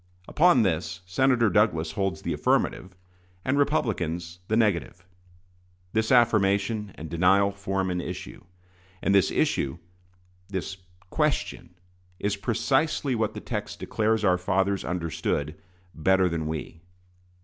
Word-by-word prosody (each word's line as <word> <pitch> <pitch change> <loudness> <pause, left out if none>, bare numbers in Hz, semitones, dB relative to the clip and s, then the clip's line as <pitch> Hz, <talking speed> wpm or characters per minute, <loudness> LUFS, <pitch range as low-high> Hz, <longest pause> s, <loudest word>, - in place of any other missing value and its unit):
Upon 165 -6 +4
this, 90 -1 -1
Senator 120 +3 +2
Douglas 85 -6 +2
holds 95 -3 -2
the - - -1
affirmative, 95 0 0 0.5
and 130 - +1
Republicans 90 - -1
the 110 - +1
negative. 90 -4 0 0.9
This 110 +2 +1
affirmation 105 -3 +3
and 80 - -8
denial 95 +5 +3
form 95 -1 -2
an 90 0 -1
issue; - - -7 0.6
and 100 - +2
this 100 -3 +4
issue 70 +4 0 0.7
this 95 0 -4 0.3
question 85 +1 -1 0.4
is 100 0 0
precisely 130 +6 0
what 110 -3 -1
the - - -6
text - - -5
declares 110 0 0
our 90 -1 +3
fathers 95 +2 0
understood 80 -4 -2 0.4
"better 95 +3 +3
than 80 -2 -2
we." 80 +1 -5
95 Hz, 120 wpm, -26 LUFS, 85-110 Hz, 0.9 s, Upon